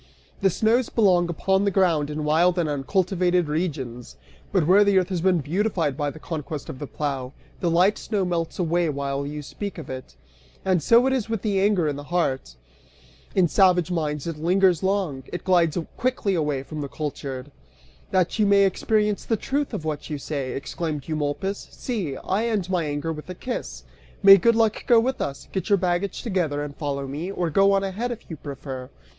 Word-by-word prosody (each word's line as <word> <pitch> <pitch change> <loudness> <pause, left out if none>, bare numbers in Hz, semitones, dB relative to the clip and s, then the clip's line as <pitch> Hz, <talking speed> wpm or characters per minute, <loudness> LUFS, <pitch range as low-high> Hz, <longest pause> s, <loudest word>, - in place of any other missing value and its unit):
The 195 - +4
snows 225 +6 +2
belong 180 -6 +3
upon 190 +4 +1
the 200 - +3
ground 170 -6 +2
in 150 0 -3
wild 170 +4 +3
and 170 -3 +1
uncultivated 180 +4 +1
regions, 140 - -3 0.3
but 180 -5 +2
where 190 +5 +6
the 200 -1 +3
earth 185 0 +2
has 180 -3 -2
been 180 -2 +3
beautified 170 -2 0
by 145 0 -1
the 150 - -9
conquest 155 -2 -5
of 130 - -7
the 145 - -5
plough, 135 -3 -3 0.3
the 175 - 0
light 180 +5 +3
snow 205 -4 -1
melts 170 -2 -2
away 170 -1 +1
while 140 -1 -2
you 150 0 -5
speak 200 +7 -6
of 160 - -7
it. 130 - -8 0.5
And 185 -3 +2
so 235 - +5
it 265 - +2
is 235 -4 -1
with 225 -2 -3
anger 200 -4 +2
in 145 -1 -2
the 145 - -8
heart; 140 - -1 0.8
in 185 -2 +4
savage 180 -1 +3
minds 150 -4 -2
it 165 -3 -4
lingers 180 +1 +3
long, 190 -8 0
it 175 - -5
glides 175 -4 +3 0.2
quickly 250 -5 0
away 150 -6 0
from 155 +2 -6
the 140 - -3
cultured. 140 -2 -5 0.6
"That 185 +3 +1
you 210 - +4
may 200 0 +5
experience 210 +2 +1
the 225 - +1
truth 280 +6 -2
of 195 -9 -5
what 150 -2 -4
you 150 - -3
say," 140 -2 -4
exclaimed 150 +1 -4
Eumolpus, 155 +6 -2
"see! 190 - -4
I 210 +5 -1
end 200 -5 -1
my 175 -3 +1
anger 145 +2 -2
with 150 +3 -10
a 185 - -5
kiss. 245 +7 -5 0.4
May 195 0 +10
good 230 +5 +3
luck 225 -2 +2
go 235 -2 +7
with 260 +3 -1
us! 140 0 -4
Get 190 - -3
your 200 - +5
baggage 180 +1 -1
together 170 - -1
and 145 -1 -7
follow 140 -2 -3
me, 150 +8 -4
or 175 -4 -2
go 195 +5 +5
on 195 0 +2
ahead, 200 +6 -2
if 235 - -8
you - - -4
prefer." 135 -3 -7
175 Hz, 195 wpm, -24 LUFS, 150-195 Hz, 0.8 s, May